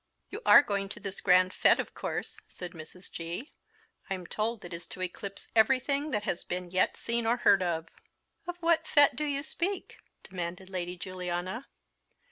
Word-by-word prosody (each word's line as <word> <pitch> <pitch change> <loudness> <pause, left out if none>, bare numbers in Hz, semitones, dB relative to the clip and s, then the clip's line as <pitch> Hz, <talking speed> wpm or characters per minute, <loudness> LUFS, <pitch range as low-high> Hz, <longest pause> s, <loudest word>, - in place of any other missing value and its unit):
"You 420 - -6
are - - +10
going 200 -3 -2
to - - -7
this 195 -1 -6
grand 185 +1 +5
fete, - - +5
of - - -3
course," - - -4
said 180 -1 -8
Mrs. 170 +2 -10
G. 170 - -5 0.6
"I'm 185 -2 -3
told 215 +3 -2
it 175 - -8
is 170 0 -7
to 185 - -8
eclipse 195 +2 -6
everything 270 +6 +3
that 210 -7 -1
has 175 - -1
been 180 0 -4
yet 185 0 +2
seen 235 -1 -1
or 235 +2 +3
heard 200 -5 +5
of." 165 -2 -1 0.6
"Of 355 0 -4
what 335 -1 +3
fete 290 -1 +6
do 300 - -1
you 280 -1 -1
speak?" 360 +4 -3 0.3
demanded 180 0 -5
Lady 180 -1 -3
Juliana. 185 +5 -4
195 Hz, 175 wpm, -30 LUFS, 180-245 Hz, 0.6 s, are